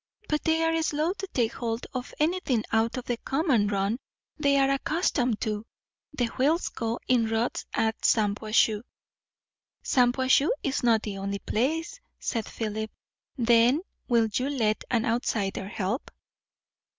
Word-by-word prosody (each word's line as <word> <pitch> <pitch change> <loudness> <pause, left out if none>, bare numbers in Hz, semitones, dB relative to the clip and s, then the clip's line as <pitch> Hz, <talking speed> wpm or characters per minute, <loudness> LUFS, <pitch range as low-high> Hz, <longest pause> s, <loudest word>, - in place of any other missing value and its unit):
But 300 -1 0
they 320 0 +2
are 325 0 +2
slow 315 +2 0
to 390 0 -6
take 240 -10 0
hold 230 -1 -3
of 255 -1 -4
anything 305 -8 +1
out 225 +2 +1
of 250 - -5
the 240 - -1
common 265 - +1
run 200 +3 0 0.4
they 280 -2 +2
are 275 0 +4
accustomed 275 - 0
to. 210 -1 -2 0.5
The 250 -4 0
wheels 280 +8 +1
go 230 +1 -3
in 240 -3 +3
ruts 225 +2 -1
at 220 0 0
Shampuashuh." 215 0 +2 1.0
"Shampuashuh 260 +3 +3
is 275 -1 0
not 230 -3 +3
the 200 -2 -4
only 200 +1 -2
place," 300 +12 -1 0.2
said 225 -3 -3
Philip. 220 -1 -3 0.5
"Then 240 +4 +4 0.3
will 235 -3 +3
you 255 +5 0
let 220 -7 0
an 235 0 +1
outsider 215 -5 -1
help?" 205 +4 -3
240 Hz, 140 wpm, -27 LUFS, 220-275 Hz, 1.0 s, are